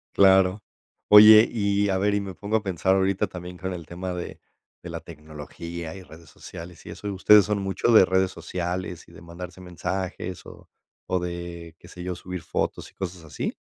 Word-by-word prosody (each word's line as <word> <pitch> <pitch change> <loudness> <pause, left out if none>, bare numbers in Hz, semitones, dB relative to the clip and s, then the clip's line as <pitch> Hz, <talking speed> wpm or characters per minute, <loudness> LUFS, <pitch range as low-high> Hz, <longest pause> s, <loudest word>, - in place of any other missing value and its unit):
Claro. 95 +1 +4 0.5
Oye, 105 +2 +9
y 100 -2 +1
a 95 - +1
ver, 100 +2 +1
y 100 - 0
me 95 -1 -6
pongo 105 +4 -1
a 110 - -5
pensar 95 -1 +1
ahorita 95 +1 +1
también 90 -1 -9
con 95 0 -4
el 85 -3 -7
tema 90 +1 -5
de 90 -1 -7 0.4
de 85 - -7
la 85 - -5
tecnología, 80 +2 -9
y 95 - -10
redes 80 -1 -15
sociales, 85 +4 -11
y - - -8
eso, 105 -1 -6
¿ustedes 100 +1 +6
son 105 0 -1
mucho 95 +4 0
de 110 -4 +8
redes 95 0 +1
sociales 90 0 -5
y - - -17
de - - -14
mandarse 85 +2 -10
mensajes 90 +1 -5
o - - -14 0.4
o 90 - +1
de, 85 -2 -7
qué 85 - -15
sé 90 -1 -10
yo, 90 0 -3
subir 90 0 -7
fotos - - -3
y - - -36
cosas 90 -3 -6
así? 75 -3 -4
90 Hz, 195 wpm, -25 LUFS, 85-95 Hz, 0.5 s, Oye